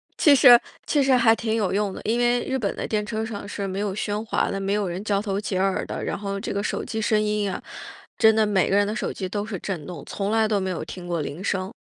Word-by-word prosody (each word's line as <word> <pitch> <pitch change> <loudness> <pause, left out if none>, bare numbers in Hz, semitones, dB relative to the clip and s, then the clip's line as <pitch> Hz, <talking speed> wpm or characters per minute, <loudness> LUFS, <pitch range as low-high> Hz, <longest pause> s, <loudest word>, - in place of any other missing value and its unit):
其 295 -3 +6
实 245 -3 +8 0.3
其 290 - +2
实 270 - +2
还 230 -2 +5
挺 225 -1 -2
有 205 -4 0
用 205 0 0
的， - - -8
因 230 +3 0
为 240 0 +2
日 265 - -2
本 200 -3 -2
的 - - -4
电 210 -1 0
车 220 0 -3
上 205 -3 -6
是 200 -1 -4
没 195 +1 -3
有 200 -2 -2
喧 210 0 -2
哗 - - 0
的， 195 - -2
没 195 +1 -1
有 205 -2 0
人 180 +3 -4
交 205 -2 +1
头 200 -1 -2
接 195 -3 -2
耳 190 0 +1
的， - - -5
然 - - -2
后 200 -1 -3
这 200 - -4
个 200 - -1
手 205 - -3
机 220 0 -3
声 215 0 +2
音 210 0 0
呀， 195 - -3 0.6
真 220 0 +5
的 220 -1 +3
每 195 -3 +2
个 195 - +3
人 205 - +3
的 215 +3 -3
手 - - -2
机 190 -2 -5
都 205 +1 -3
是 210 -3 -5
震 175 -5 -5
动， 180 - -7
从 200 0 -3
来 220 0 +2
都 210 - +1
没 190 -1 -2
有 175 - -3
听 180 -1 -8
过 170 -2 -2
铃 150 +5 -5
声。 190 0 -1
205 Hz, 310 characters per minute, -24 LUFS, 195-220 Hz, 0.6 s, 实